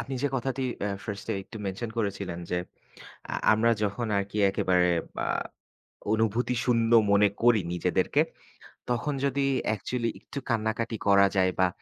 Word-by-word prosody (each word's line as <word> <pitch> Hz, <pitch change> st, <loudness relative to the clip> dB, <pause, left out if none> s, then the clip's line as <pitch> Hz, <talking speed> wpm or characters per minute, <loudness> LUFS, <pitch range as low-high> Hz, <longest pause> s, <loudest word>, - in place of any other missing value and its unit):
আপনি 135 Hz, -, -5 dB
যে 145 Hz, -, +2 dB
কথাটি 135 Hz, +1 st, -2 dB, 0.2 s
আ -, -, -1 dB, 0.2 s
ফার্স্ট 100 Hz, -2 st, -6 dB
এ -, -, -1 dB
একটু 110 Hz, -, -11 dB
মেনশন 100 Hz, +4 st, -4 dB
করেছিলেন 100 Hz, -5 st, -2 dB
যে, 90 Hz, -, +1 dB, 0.7 s
আ -, -, -2 dB, 0.2 s
আমরা 115 Hz, +2 st, +3 dB
যখন 105 Hz, +3 st, -1 dB
আরকি 100 Hz, +2 st, -3 dB
একেবারে 90 Hz, -2 st, +2 dB, 0.3 s
আ -, -, -1 dB, 0.9 s
অনুভূতি 115 Hz, +3 st, +1 dB
শূন্য 115 Hz, -2 st, +2 dB, 0.2 s
মনে 100 Hz, 0 st, +5 dB
করি 120 Hz, -3 st, +5 dB
নিজেদেরকে। 90 Hz, -, +1 dB, 0.7 s
তখন 125 Hz, +4 st, 0 dB
যদি 140 Hz, 0 st, +1 dB, 0.2 s
অ্যাকচুয়ালি 115 Hz, +2 st, -1 dB
একটু 140 Hz, -, -7 dB
কান্নাকাটি 115 Hz, 0 st, -1 dB
করা 100 Hz, 0 st, +6 dB
যায় 95 Hz, -1 st, +3 dB
বা 95 Hz, -, +5 dB
110 Hz, 145 wpm, -27 LUFS, 100-120 Hz, 0.9 s, করা